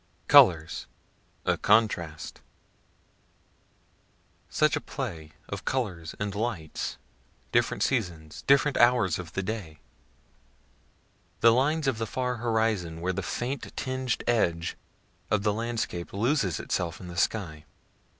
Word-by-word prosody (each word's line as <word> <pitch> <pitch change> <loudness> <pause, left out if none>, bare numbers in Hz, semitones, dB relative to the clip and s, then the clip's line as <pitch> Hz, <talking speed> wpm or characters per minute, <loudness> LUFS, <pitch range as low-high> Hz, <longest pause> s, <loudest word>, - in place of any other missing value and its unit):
COLORS 80 -2 +5 0.6
A - - +1
CONTRAST 90 -8 +1 2.1
Such - - +2
a - - -2
play 80 -2 -6
of 100 -2 -6
colors 95 -11 -2
and 100 0 -2
lights, 105 -7 -3 0.5
different 120 -4 +2
seasons, 85 - -2
different 140 +1 +4
hours 120 -9 +4
of 80 -3 -8
the 95 - -2
day 95 -7 -5 1.6
the 115 - +8
lines 150 +6 +2
of 130 -5 0
the 115 - -2
far 125 +1 -2
horizon 110 -8 0
where 90 +2 -1
the 100 - -2
faint 125 +7 -4
tinged 130 -2 -2
edge 85 -8 +1 0.5
of 105 -2 +1
the 105 -1 +2
landscape 115 -6 -3
loses 110 - +1
itself 85 -2 -2
in 90 - -9
the 85 - -8
sky. 85 -5 -1
105 Hz, 120 wpm, -28 LUFS, 85-120 Hz, 2.1 s, the